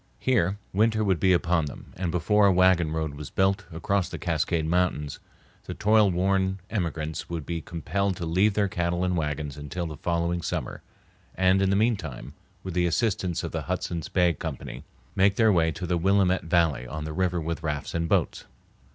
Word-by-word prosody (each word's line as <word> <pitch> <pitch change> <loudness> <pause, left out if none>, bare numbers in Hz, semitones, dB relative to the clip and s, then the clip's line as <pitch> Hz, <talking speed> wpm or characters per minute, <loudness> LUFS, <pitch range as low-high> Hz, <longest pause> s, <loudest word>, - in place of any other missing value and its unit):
Here 105 -7 +1 0.2
winter 110 +2 +2
would 95 -5 +1
be 95 +4 +3
upon 85 -2 +2
them, 70 - -10
and 90 -1 -2
before 100 +5 +3
a - - +5
wagon 90 -3 +4
road 80 -2 -2
was 75 0 -8
built 95 0 +1
across 90 +3 -1
the - - -6
Cascade 80 -1 0
Mountains 80 -4 0 0.5
the - - -6
toil 105 -1 +4
worn 95 +1 +1
emigrants 80 -6 -3
would 85 -4 -4
be 85 -1 -3
compelled 90 +5 -2
to 85 - -4
leave 95 +6 +2
their 105 -1 +2
cattle 85 -1 -1
and 90 -1 0
wagons 75 -2 -3
until 75 +5 -4
the 75 -3 -6
following 85 +2 -1
summer, - - -4 0.5
and, 95 +1 +3
in 95 - +2
the 100 - +2
mean 110 +2 +3
time, 70 -5 -8 0.3
with 95 - -5
the 90 0 +2
assistance 90 -2 0
of - - -4
the - - -3
Hudson's 85 -3 -3
Bay 90 -2 +3
Company, - - -6 0.3
make 100 +1 +4
their 110 -1 +4
way 80 -2 +3
to 90 - -5
the 90 0 0
Willamette 95 0 +2
Valley 80 -7 +1
on 75 +3 -5
the 80 - -5
river 90 0 0
with 80 -1 -3
rafts 75 -3 -3
and 85 0 -1
boats. - - 0
85 Hz, 195 wpm, -26 LUFS, 80-95 Hz, 0.5 s, a